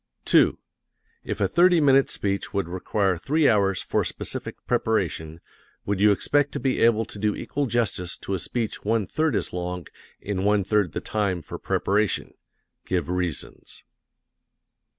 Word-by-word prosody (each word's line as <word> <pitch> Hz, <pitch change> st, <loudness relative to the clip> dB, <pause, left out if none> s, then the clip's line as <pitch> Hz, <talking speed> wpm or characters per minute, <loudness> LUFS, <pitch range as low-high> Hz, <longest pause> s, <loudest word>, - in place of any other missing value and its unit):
2. -, -, +4 dB, 0.7 s
If -, -, -4 dB
a -, -, +2 dB
thirty 175 Hz, 0 st, +4 dB
minute 135 Hz, -2 st, +4 dB
speech 100 Hz, 0 st, -2 dB
would 100 Hz, -3 st, 0 dB
require 95 Hz, +1 st, -1 dB
three 150 Hz, -, +2 dB
hours 100 Hz, -3 st, +2 dB
for -, -, 0 dB
specific -, -, -5 dB
preparation, 80 Hz, +1 st, -1 dB, 0.4 s
would 100 Hz, -1 st, -1 dB
you 105 Hz, 0 st, +6 dB
expect 145 Hz, +8 st, +1 dB
to -, -, -2 dB
be 135 Hz, -1 st, 0 dB
able 115 Hz, -1 st, +4 dB
to 100 Hz, -, -11 dB
do 105 Hz, 0 st, +1 dB
equal 145 Hz, 0 st, -2 dB
justice 105 Hz, -7 st, -1 dB
to 100 Hz, -, -5 dB
a 95 Hz, -, -1 dB
speech 115 Hz, +4 st, -3 dB
one 110 Hz, 0 st, +1 dB
third 155 Hz, -, 0 dB
as -, -, -2 dB
long 90 Hz, -1 st, -4 dB, 0.3 s
in 95 Hz, -2 st, -3 dB
one 105 Hz, 0 st, +3 dB
third 100 Hz, -3 st, +1 dB
the -, -, -3 dB
time 100 Hz, -5 st, -1 dB
for -, -, -8 dB
preparation? 105 Hz, +1 st, 0 dB, 0.5 s
Give 90 Hz, -3 st, -2 dB
reasons. 90 Hz, -5 st, -4 dB
100 Hz, 155 wpm, -25 LUFS, 90-115 Hz, 0.7 s, you